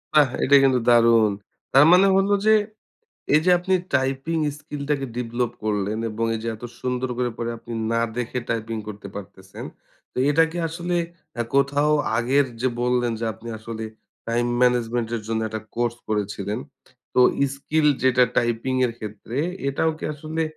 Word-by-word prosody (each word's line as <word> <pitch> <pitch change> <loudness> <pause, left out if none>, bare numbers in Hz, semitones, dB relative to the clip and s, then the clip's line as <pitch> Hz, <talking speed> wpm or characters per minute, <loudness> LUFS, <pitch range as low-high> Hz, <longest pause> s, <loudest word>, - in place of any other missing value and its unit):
বাহ! 150 -3 +6
এটা 140 - +5
কিন্তু 130 -2 +4
দারুণ। 115 -2 +5 0.4
তার 135 +3 +8
মানে 185 +2 +7
হলো 195 +1 +3
যে, 220 - +6 0.8
এই 155 - +6
যে 180 - +4
আপনি 185 +2 0 0.2
টাইপিং 135 +5 0 0.2
স্কিল 145 -1 -7
টাকে 140 -2 0
ডিভলপ 120 0 -2
করলেন 105 0 -1
এবং 110 +2 -2
এই 110 - -3
যে - - -2
এত 110 - -11 0.2
সুন্দর 125 0 -2
করে 125 -1 0
পরে 120 0 -2
আপনি 115 +1 -10 0.2
না 115 - +2 0.2
দেখে 125 0 -2
টাইপিং 115 0 -2
করতে 100 -1 -8
পারতেছেন। 95 -1 -9 0.5
তো - - -29
এটা 165 +3 +5
কি 170 - -8
আসলে 170 +2 -3 0.5
আ - - +3
কোথাও 145 +2 +3 0.2
আগের 130 +5 +3 0.2
যে 130 - +2
বললেন 125 -1 +1
যে - - -1
আপনি 110 +2 -11
আসলে 110 0 -6 0.4
টাইম 120 +1 +1 0.2
ম্যানেজমেন্ট 120 -2 +1
এর 110 - -6
জন্য 110 0 0
একটা 110 0 -5 0.2
কোর্স 120 0 0
করেছিলেন। 105 0 -2 0.6
তো - - +4 0.3
স্কিল 150 +2 0 0.2
যেটা 130 -1 +4
টাইপিং 120 +2 0
এর 120 - -4
ক্ষেত্রে 110 +2 -7 0.3
এটাও 140 +4 +1
কি - - -7
আসলে 155 +2 -3
120 Hz, 165 wpm, -23 LUFS, 115-140 Hz, 0.8 s, তার